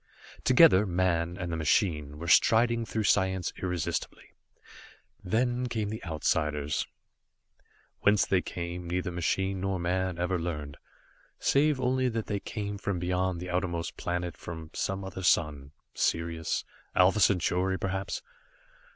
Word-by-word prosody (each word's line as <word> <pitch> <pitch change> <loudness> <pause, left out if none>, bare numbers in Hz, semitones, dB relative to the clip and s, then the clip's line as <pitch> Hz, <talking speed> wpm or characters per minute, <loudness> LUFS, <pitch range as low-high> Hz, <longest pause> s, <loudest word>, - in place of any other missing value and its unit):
Together, 95 +3 +6
man 85 -1 0
and 85 -1 -4
the - - -1
machine 75 -2 +1
were 85 +2 -6
striding 115 +6 +4
through 110 - -1
science 95 -2 +1
irresistibly. 85 -4 -3 0.9
Then 120 +5 0
came 110 -4 -2
the 110 +1 -6
Outsiders. 75 -2 -1 1.1
Whence 105 -1 +4
they 95 -2 +2
came, 85 0 -5
neither 90 0 -1
machine 95 +2 -1
nor 95 0 -1
man 90 +1 -1
ever 90 +1 0
learned, 75 -4 -4 0.6
save 145 0 +2
only 130 0 +1
that 115 -2 -3
they 100 -2 -2
came 100 -1 -5
from 100 -2 -2
beyond 90 0 -1
the 90 +1 -5
outermost 85 -2 -2
planet, 90 -1 -3
from 80 -2 -8
some 95 0 -2
other 95 0 -6
sun. 75 -5 +1 0.2
Sirius 85 -1 -1 0.3
Alpha 95 +3 +5
Centauri 95 -1 +2
perhaps! 95 +1 -3
90 Hz, 130 wpm, -29 LUFS, 85-100 Hz, 1.1 s, Together